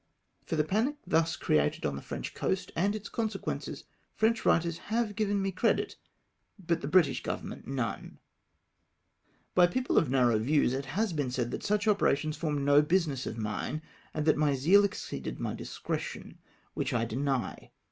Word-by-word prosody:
For - - -1
the 155 - +3
panic 225 - 0
thus 165 0 +2
created 75 -1 +1
on 70 - -1
the 70 - -6
French - - -6
coast, 190 -1 -2
and 200 +5 +1
its 215 -1 -6
consequences, 220 -3 -3 0.3
French 220 +1 +2
writers 170 0 +2
have 220 -2 0
given 205 -2 +1
me 195 0 0
credit, 190 +5 +1 0.6
but 170 -3 -1
the - - -3
British 160 -3 +3
Govern - - -4
ment - - -9
none! 130 -3 -3 1.4
By 180 -1 +6
people 255 +8 +2
of 160 - -1
narrow 125 -4 +3
views 135 +2 +2
it 135 +1 -2
has 190 +8 -1
been 145 -4 -1
said 125 -1 -2
that - - -4
such 210 0 0
operations 155 -7 +2
formed 150 -4 -1
no 145 +1 +6
business 150 -5 0
of 110 - -5
mine, 110 +8 -3 0.3
and 150 - -2
that 155 - +4
my 145 -2 +2
zeal 180 +10 +5
exceeded 200 - -5
my - - -2
discretion, - - -5 0.3
which - - -2
I 115 -1 +1
deny. 130 +3 -2
160 Hz, 170 wpm, -30 LUFS, 135-200 Hz, 1.4 s, By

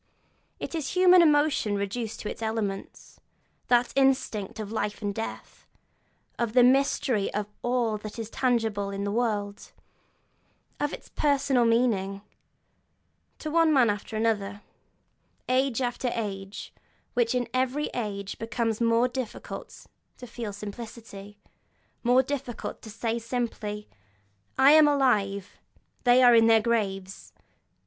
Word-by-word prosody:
It - - -6
is 315 -5 -3
human 365 0 +7
emotion 295 -9 +3
reduced 215 +3 -4
to - - -5
its - - -9
elements; 220 -3 -4 0.5
that 245 0 +3
instinct 260 -7 +1
of 210 -1 -5
life 210 -1 -3
and 205 -1 -1
death, 225 +2 -7 0.7
of 235 -2 -1
the 250 0 +6
mystery 255 -4 +2
of 210 0 -1 0.2
all 240 -3 0
that 215 +1 -8
is 225 -2 -4
tangible 225 -5 0
in 200 0 -4
the 200 - -2
world, 205 -3 -2 1.1
of 290 0 -1
its - - -9
personal 275 -4 +2
meaning, 210 -4 +1 1.1
to 310 - -5
one 330 0 +4
man 255 -7 +4
after 205 +2 -6
another, 205 -2 -1 0.8
age 260 -1 +1
after 245 +1 -1
age, 195 -3 -5 0.4
which 240 -1 +1
in 245 -2 0
every 260 +3 0
age 200 -4 -4
becomes 225 0 -2
more 230 +1 +3
difficult 250 -2 -7 0.3
to 250 - -9
feel 235 -3 -6
simply, 205 -1 -9 0.6
more 250 +2 +4
difficult 265 -4 -5
to 220 - -10
say 225 +2 -2
simply. 225 -3 -4 0.7
'I 270 +2 +7
am 310 0 +7
alive, 210 -9 +1 0.5
they 245 +1 +6
are 245 -1 +8
in 225 -1 +6
their 225 -1 +6
graves!' 200 -4 -2
230 Hz, 130 wpm, -27 LUFS, 210-255 Hz, 1.1 s, are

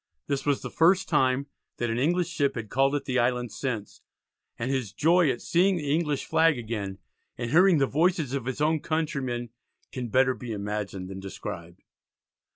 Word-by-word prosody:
This 140 0 -2
was 145 -2 +1
the - - -5
first 180 +3 +3
time 135 -3 +2 0.3
that 120 -1 -1
an 115 - -1
English 175 +6 +1
ship 145 -3 0
had 110 -3 -6
called 135 +2 +2
at 145 - -2
the 130 -1 0
island 120 -1 0
since, 110 -3 -4 0.6
and 120 +3 -2
his 130 -7 -1
joy 170 +3 +4
at 120 -2 -2
seeing 185 +2 +3
the 145 -3 -1
English 150 -4 0
flag 165 -4 +3
again 105 -5 -4 0.4
and 120 -1 -4
hearing 180 +2 +6
the 140 - +3
voices 160 -1 +1
of 135 -4 -2
his 130 +2 -3
own 155 +1 +2
countryman 135 -7 -2 0.4
can 125 -2 -4
better 130 +3 +3
be 120 -3 -6
imagined 100 -2 -4
than 95 0 -7
described. 85 -3 -8
130 Hz, 180 wpm, -27 LUFS, 115-155 Hz, 0.6 s, hearing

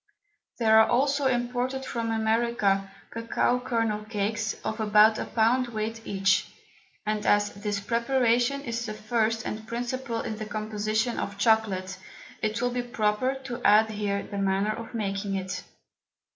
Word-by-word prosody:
There 220 -2 +5
are 220 - +5
also 275 +3 +2
imported 250 +1 -1
from 230 -1 -3
America, 220 -3 +1 0.2
Cocao 230 +2 0
Kernel 225 -4 0
Cakes 215 0 -2
of 220 - -3
about 215 0 +5
a - - -2
Pound 245 +3 +2
weight 225 0 -4
each; 195 0 +2 0.6
and 215 0 -1
as 205 0 +3
this 205 0 -3
Preparation 240 +4 +1
is 235 -3 -3
the 215 - -4
first 220 +1 0
and 220 +1 -5
principal 240 0 -3
in 215 - -4
the 215 - -5
Composition 215 +2 -1
of 200 - -4
Chocolate, 200 -4 +1 0.4
it 215 +1 -1
will 245 - +1
be 245 0 -1
proper 240 +1 0
to 245 -2 -6
add 220 +1 +5
here 205 -1 -2
the 200 - -6
Manner 195 +2 +1
of 230 +1 -8
making 195 -2 -2
it. 185 -1 -4
220 Hz, 150 wpm, -27 LUFS, 210-240 Hz, 0.6 s, There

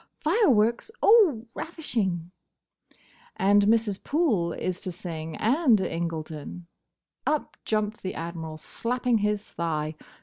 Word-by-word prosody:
"Fireworks! 280 - +3
Oh, 370 - +5
ravishing!" 195 - -3 1.0
"And 200 +1 +4
Mrs. 220 -3 +2
Poole 250 - +1
is 185 +1 -3
to 185 - -4
sing; 165 -2 -6
and 245 -1 +3
Incledon." 165 -2 -4 0.6
Up 305 -1 0
jumped 215 0 -1
the 185 - -4
Admiral, 165 -1 -5
slapping 240 +6 0
his 210 0 -1
thigh. 155 -2 -2
205 Hz, 105 wpm, -26 LUFS, 170-240 Hz, 1.0 s, Oh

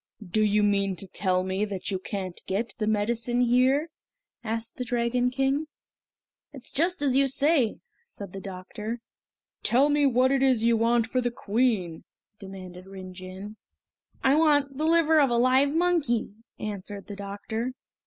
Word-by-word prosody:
"Do 215 +5 +1
you 210 0 +3
mean 200 -2 +1
to 190 +3 -5
tell 185 -1 0
me 190 +2 -1
that 200 -1 -3
you 190 - -1
can't 185 -2 -5
get 215 +5 -2
the 215 - -1
medicine 230 +3 0
here?" 255 +6 +3 0.5
asked 225 0 -3
the 250 - -2
Dragon 245 0 0
King. 270 +4 0 0.9
"It 270 -4 -10
is - - -8
just 340 +1 0
as 265 -3 +2
you 275 0 +4
say!" 270 -3 +2 0.3
said 200 - -9
the 195 - -6
doctor. 205 +5 -6 0.6
"Tell 265 +5 +3
me 290 -1 +3
what 255 +1 +3
it 275 -1 +2
is 260 -4 +3
you 235 0 +4
want 230 +1 +2
for 255 +2 -1
the 245 - 0
Queen?" 215 -7 -1 0.4
demanded 185 -2 -10
Rin 190 -1 -9
Jin. 190 +3 -9 0.7
"I 265 - +5
want 290 -3 +2
the 310 - +1
liver 320 -2 +4
of 275 - +4
a 240 - +1
live 260 +3 +4
monkey!" 325 - +1 0.2
answered 205 -1 -6
the 205 - -8
doctor. 205 +5 -4
235 Hz, 165 wpm, -26 LUFS, 200-265 Hz, 0.9 s, I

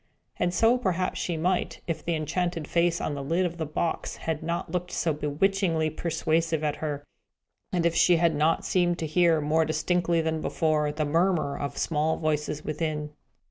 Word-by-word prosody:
And 175 - +1
so 230 +6 +3
perhaps 185 -5 -1
she 170 -2 -2
might, 180 +3 -1
if 165 - -3
the 170 - 0
enchanted 165 +1 -2
face 170 0 +2
on 150 - -2
the 140 -1 -4
lid 170 +6 +1
of 170 -1 -3
the 160 -2 -3
box 160 +2 -2
had 160 -2 -3
not 170 +1 -3
looked 180 0 -2
so 160 -2 0
bewitchingly 160 +2 0
persuasive 160 0 0
at 150 -1 0
her, 145 -2 -3 0.7
and 175 -2 0
if 170 - +3
she 175 - +5
had 165 -1 +3
not 155 +2 +1
seemed 175 -2 +2
to 165 - -3
hear, 165 +1 +3
more 155 +2 +2
distinctly, 170 +2 +1
than 160 -1 -1
before, 155 -2 +1
the 155 +1 -2
murmur 165 -1 +1
of 140 0 -4
small 155 0 0
voices 150 -1 -2
within. 155 -1 -2
160 Hz, 180 wpm, -27 LUFS, 155-175 Hz, 0.7 s, she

